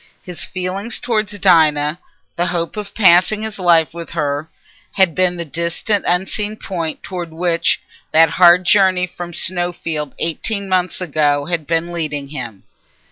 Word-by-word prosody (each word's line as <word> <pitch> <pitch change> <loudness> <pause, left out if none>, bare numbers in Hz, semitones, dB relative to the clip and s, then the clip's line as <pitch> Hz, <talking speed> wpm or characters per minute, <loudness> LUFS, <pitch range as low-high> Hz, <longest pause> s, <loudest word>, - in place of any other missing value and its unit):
His 180 -2 -6
feeling 185 +4 -4
towards 215 -4 -1
Dinah, 160 -4 +3 0.4
the 175 +1 0
hope 170 -2 -3
of 210 -2 -7
passing 195 +1 +4
his 220 -2 -5
life 170 -3 +3
with 170 -1 -8
her, 150 -1 -2 0.4
had 190 -4 +3
been 185 0 +1
the 170 -1 -5
distant 170 +6 -2
unseen 195 +4 -1
point 170 -7 -5
towards 175 -3 -6
which 170 0 0 0.3
that 165 +1 +5
hard 180 0 +6
journey 185 -2 +4
from 175 -1 -8
Snowfield 170 -4 0
eighteen 200 +5 -2
months 185 -1 0
ago 145 -4 +1
had 165 -3 -3
been 170 +1 -1
leading 150 -4 -3
him. 120 -9 -7
175 Hz, 145 wpm, -18 LUFS, 160-185 Hz, 0.4 s, hard